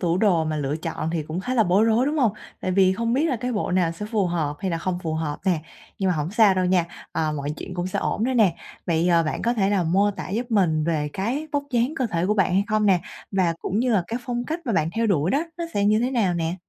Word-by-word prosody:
tủ 175 -1 +1
đồ 180 -7 +3
mà 155 -1 -2
lựa 145 +1 -1
chọn 165 -1 -4
thì 165 -2 -1
cũng 160 +4 -4
khá 255 +7 -3
là 225 - +5
bối 190 +5 +3
rối, 230 +4 +3
đúng 305 +1 0
hông? 230 -6 +3 0.3
Tại 185 - -2
vì 190 0 +4
không 230 +3 -1
biết 280 +5 +2
là 260 - 0
cái 250 +2 -3
bộ 210 - -1
nào 180 -2 +2
sẽ 210 +5 -6
phù 215 -4 0
hợp 155 -4 -1
hay 190 - -1
là 165 - -1
không 180 +1 -2
phù 160 -1 -2
hợp 155 -2 -3
nè. 175 -4 +2 0.4
Nhưng 190 - +1
mà 170 - 0
hổng 150 +3 -2
sao 210 -3 +5
đâu 185 - +1
nha, 180 -2 +3 0.3
à, 155 -1 0
mọi 145 -1 -3
chuyện 180 - -7
cũng 175 0 -2
sẽ 185 - -3
ổn 220 - -1
thôi 260 0 0
nè. 205 -8 +3 0.3
Vậy, 170 0 +1
ờ, 170 -1 +4
bạn 155 - -3
có 235 +1 +1
thể 200 -3 +1
là 195 -3 +2
mô 195 +5 +2
tả 190 -2 -7
giúp 235 +5 -3
mình 165 -8 +2
về 155 -3 0
cái 250 +11 -2
vóc 285 0 +1
dáng 245 +4 +1
cơ 255 - 0
thể 175 -3 -1
của 210 - +2
bạn 190 -2 +2
hay 195 +2 +3
không 215 0 +2
nè? 185 -3 +4 0.3
Và 180 -4 +1
cũng 200 - -2
như 245 0 +1
là 195 -4 +3
cái 235 +2 -3
phong 240 -1 -2
cách 320 +6 -3
mà 235 - 0
bạn 160 -4 +1
theo 230 +1 0
đuổi 175 -3 +1
đó, 290 +4 +1
nó 340 - -2
sẽ 200 - +1
như 210 +1 +4
thế 245 +3 0
nào 205 -9 +1
nè? 165 0 -1
190 Hz, 300 wpm, -24 LUFS, 165-225 Hz, 0.4 s, là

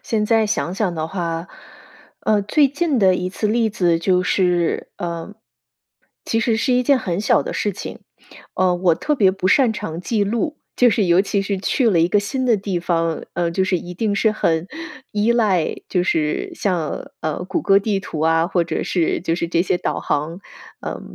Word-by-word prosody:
现 215 -2 -1
在 225 -1 +3
想 190 -4 -1
想 195 -4 -1
的 160 -1 -2
话， 170 -1 -3 0.7
呃， 210 -1 +2
最 280 +9 +3
近 290 -1 0
的 190 -3 +4
一 180 0 -2
次 210 - -2
例 225 +1 +1
子 175 -6 +1
就 180 +2 +2
是， 180 -2 +1
呃， 170 +3 -5 0.9
其 225 - 0
实 230 -2 +1
是 255 +4 +1
一 250 0 +3
件 275 +2 +3
很 180 -5 -2
小 210 - +3
的 - - -5
事 205 - -1
情。 - - -8 0.5
呃， 185 -1 +2
我 175 -1 +2
特 300 - -1
别 200 -9 +4
不 190 -1 -3
擅 245 +3 +4
长 165 -6 -5
记 205 +2 0
录， 235 +8 -2 0.2
就 245 -2 +5
是 210 - +1
尤 175 0 +4
其 200 0 0
是 200 0 -2
去 235 +5 +1
了 180 -6 +3
一 165 - +3
个 205 - +3
新 260 +6 -2
的 235 -4 +3
地 190 -3 -3
方， 165 -2 -1
呃， 170 0 0
就 190 +3 0
是 190 -1 +1
一 175 +1 -8
定 205 +2 -1
是 215 +2 +2
很 165 -5 0 0.5
依 210 +3 +2
赖， 205 -8 +1
就 180 -2 +1
是 155 -4 -1
像 175 -6 -2
呃 155 +3 -3
谷 185 - -2
歌 195 0 +5
地 200 -1 -1
图 165 -4 -6
啊， 165 +1 +3
或 175 -3 +1
者 170 - -2
是 170 -3 0
就 165 -1 -1
是 170 - -2
这 170 0 +2
些 185 - 0
导 - - -2
航 160 +5 -2 0.4
呃 - - -5
190 Hz, 220 characters per minute, -20 LUFS, 170-215 Hz, 0.9 s, 就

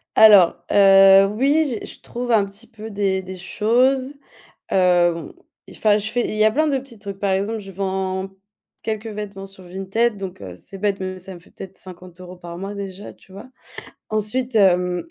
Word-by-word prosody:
Alors, 205 -5 +7 0.2
heu, 195 -1 +7
oui, 270 +5 +1
j'ai - - -7
je - - -12
trouve 245 0 -5
un 210 -3 +4
petit 200 +4 -11
peu 220 -1 -10
des 200 -2 -1
des 185 0 -9
choses. 255 +8 +1 0.6
Heu, 175 -2 +2 0.3
enfin, 210 -1 +1
je 210 - -3
fais 240 +1 -1
il - - -4
y 215 - +3
a 215 - +5
plein 310 +5 +1
de 275 - +1
petits 255 -4 -11
trucs. 200 -1 -8
Par 200 -1 0
exemple, 200 +4 -1
je 195 -2 -10
vends 190 0 -3 0.5
quelques 220 0 -4
vêtements 205 -2 -7
sur 195 -1 -13
Vinted, 195 +5 -1
donc 190 - -7
heu, 95 -3 -8
c'est 195 - -12
bête, 200 0 -1
mais 185 0 -5
ça 185 +1 -9
me - - -11
fait - - -22
peut-être 190 - -11
50 180 -1 -12
euros 180 0 -10
par 170 -1 -9
mois 195 +2 -6
déjà, 200 0 -8
tu 190 - -21
vois? 200 +7 -11 0.6
Ensuite, 225 +3 -2
hem, 180 -3 +2
195 Hz, 195 wpm, -21 LUFS, 190-220 Hz, 0.6 s, Alors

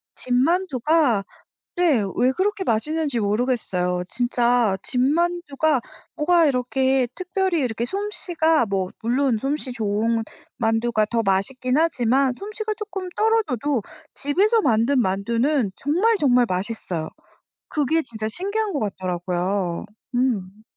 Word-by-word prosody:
집만두가 270 - +1 0.5
네 320 - +3
왜 255 +1 +3
그렇게 385 +5 -1
맛있는지 290 +2 0
모르겠어요. 200 -5 0
진짜 240 -2 +1
집만두가 305 0 +1 0.3
뭐가 335 +2 +3
이렇게 260 -1 +1
특별히 370 -2 -1
이렇게 235 -3 -1
솜씨가 330 - 0
뭐 190 -2 -1
물론 245 +1 +1
솜씨 270 +1 -2
좋은 225 +1 0 0.3
만두가 225 -1 +1
더 230 -1 +1
맛있긴 250 +7 0
하지만 265 -4 +2
솜씨가 430 +1 -4
쪼끔 385 -4 -5
떨어져도 295 - +1 0.3
집에서 405 +11 +2
만든 250 - +2
만두는 230 +5 0
정말 370 +11 +2
정말 250 -7 +4
맛있어요. 185 -4 -3 0.6
그게 305 +2 +1
진짜 220 -6 -5
신기한 405 - -2
것 285 - -1
같더라고요. 180 -2 -2 0.3
음. 215 -5 -1
255 Hz, 270 characters per minute, -23 LUFS, 220-325 Hz, 0.6 s, 정말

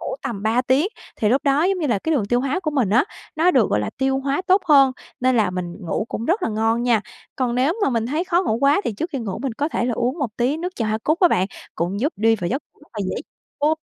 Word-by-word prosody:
ngủ - - -4
tầm 205 -4 -4
3 230 +3 +2
tiếng. 265 +8 +2 0.3
Thì 210 - +1
lúc 260 +5 +2
đó, 280 +3 +3
giống 380 0 +1
như 310 - -1
là, 225 -6 +1
cái 320 +9 -1
đường 235 -8 +1
tiêu 245 +3 +1
hóa 275 +7 -1
của 310 -4 -2
mình 255 -9 +1
á, 245 +8 +4 0.3
nó 335 +3 +4
được, 250 - +3
gọi 105 - +2
là, 105 - -3
tiêu 265 0 +1
hóa 280 +6 -1
tốt 380 +1 +4
hơn, 275 -3 +6 0.3
nên 255 -1 +3
là 210 -5 +2
mình 180 -1 -5
ngủ 175 +5 -2
cũng 230 - -4
rất 365 +6 +1
là - - +1
ngon 225 +2 +1
nha. 235 -3 +3 0.4
Còn 245 -2 0
nếu 265 +6 +2
mà - - +3
mình 230 -2 0
thấy 310 +7 -1
khó 360 0 +2
ngủ 220 - 0
quá 285 +7 +4
thì 230 - -1
trước 325 - -4
khi 275 - -3
ngủ, 210 -5 -4
mình 270 - -2
có 295 +5 -1
thể 240 - -1
là 245 - 0
uống 250 +8 -1
một 260 -6 -1
tí 255 +5 +1
nước 360 +3 -5
trà 225 - -1
hoa 215 +1 0
cúc 310 +5 +1
á 355 - +7
bạn, 185 - +2 0.3
cũng 180 +5 -2
giúp 290 +6 0
đi 225 +2 +3
vào 175 -3 -3
giấc 265 +5 -2
ngủ - - -30
rất 295 - -20
là 210 - -4
dễ - - -3 0.5
luôn. 310 +2 +3
255 Hz, 300 wpm, -22 LUFS, 220-300 Hz, 0.5 s, á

